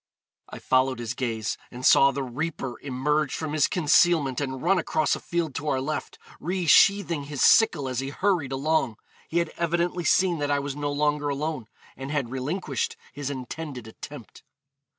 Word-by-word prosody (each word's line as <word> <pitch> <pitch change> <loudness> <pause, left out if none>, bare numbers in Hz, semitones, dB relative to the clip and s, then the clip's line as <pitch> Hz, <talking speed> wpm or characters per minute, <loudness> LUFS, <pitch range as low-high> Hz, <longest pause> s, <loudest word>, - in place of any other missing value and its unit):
I - - -8
followed 130 0 +1
his 120 0 -4
gaze, 115 -4 -3
and 125 +1 -7
saw 135 - +7
the 140 0 -3
reaper 130 0 -4
emerge 145 +2 0
from 155 -2 -4
his 155 -3 +3
concealment 155 -4 +3
and 130 -2 -3
run 185 +2 +3
across 155 -2 +1
a - - -7
field 170 -4 -2
to 145 +4 -5
our 135 -3 +1
left, 150 +4 -4 0.2
resheathing 175 -2 +3
his 145 -2 -2
sickle 220 - +5
as 130 -2 -2
he 135 0 -3
hurried 175 -3 0
along. 135 -3 0 0.3
He 170 - -2
had 170 -2 +1
evidently 175 +1 0
seen 175 +2 +2
that 145 0 -1
I 145 - +2
was 140 -1 -3
no 145 0 -2
longer 145 0 0
alone, 145 -4 -3 0.3
and 135 +1 -7
had 140 -5 -2
relinquished 135 - -3 0.2
his 145 -1 -4
intended 135 -1 -6
attempt.' 115 0 -11
145 Hz, 170 wpm, -26 LUFS, 130-160 Hz, 0.3 s, saw